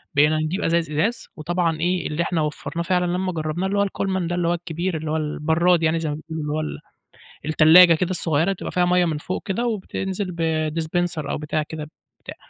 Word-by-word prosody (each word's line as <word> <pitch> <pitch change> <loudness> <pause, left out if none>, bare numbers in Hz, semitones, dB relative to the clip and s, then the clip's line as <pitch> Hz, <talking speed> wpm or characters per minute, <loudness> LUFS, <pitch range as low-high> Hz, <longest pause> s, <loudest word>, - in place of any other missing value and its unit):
بقينا 150 +2 +4
نجيب 155 +6 -1
أزايز 165 -1 +1
إزاز 205 +11 -1
وطبعًا 165 0 -1
إيه، 180 +2 0
اللي 155 +3 -1
إحنا 170 -2 -1
وفّرناه 155 +2 -3
فعلًا 180 0 +1
لما 185 +1 -1
جرّبناه 160 +2 -2
اللي 200 +1 -1
هو - - +4
الكولمن 190 -2 -2
ده، 175 - -2
اللي 175 -1 0
هو 170 - +2
الكبير، 175 0 -3
اللي 155 0 -4
هو 160 - +1
البَرّاد 160 +3 +1
يعني 160 +1 +2
زي 160 -2 -2
ما 145 - -2
بيقولوا، 160 0 -6
اللي 150 0 -2
هو 155 - -1
ال 155 - -5 0.7
التلاجة 160 +3 +7
كده 170 +2 0
الصغيرة 170 +1 +1
تبقى - - -6
فيها 180 -1 +2
مَيّة 180 0 +3
من 160 -3 -1
فوق 180 +4 -4
كده 215 +5 -1
وبتنزل 190 -3 -3
ب 160 -2 0
dispenser 165 -1 -2
أو - - -1
بتاع 150 +1 -2
كده 150 -1 -7 0.3
بتاع. - - -8
165 Hz, 215 wpm, -22 LUFS, 155-180 Hz, 0.7 s, التلاجة